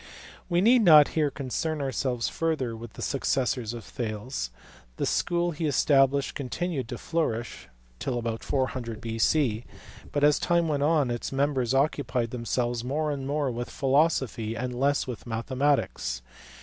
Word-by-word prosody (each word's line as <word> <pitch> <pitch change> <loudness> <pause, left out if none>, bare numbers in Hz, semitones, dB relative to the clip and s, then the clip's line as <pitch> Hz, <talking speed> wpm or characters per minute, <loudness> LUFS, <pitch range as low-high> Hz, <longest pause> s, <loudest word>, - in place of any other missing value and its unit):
We 175 0 +3
need 240 +4 +6
not 155 -7 +8
here 155 -2 +1
concern 145 +4 -3
ourselves 130 -3 -1
further 155 -8 -1
with 115 0 -9
the - - -7
successors 125 -4 0
of 120 -2 -7
Thales. 110 - -4 0.5
The - - 0
school 175 0 +1
he 160 0 -2
established 140 -1 +3
continued 140 0 -3
to 120 - -4
flourish 120 -9 -2 0.3
till 125 -2 -2
about 115 -1 -3
400 130 -5 -2
B.C., 115 +1 +1 0.5
but, 145 - 0
as 150 0 +5
time 170 -1 +2
went 145 -2 0
on, 145 -4 +2
its 120 - -3
members 135 -2 +1
occupied 135 -4 0
themselves 120 0 -1
more 150 +4 -1
and 135 -2 -4
more 145 -2 0
with 120 +1 -4
philosophy 135 -6 +1
and 125 +2 -3
less 140 +3 +1
with 125 -1 -7
mathematics. 120 - 0
135 Hz, 150 wpm, -27 LUFS, 120-150 Hz, 0.5 s, not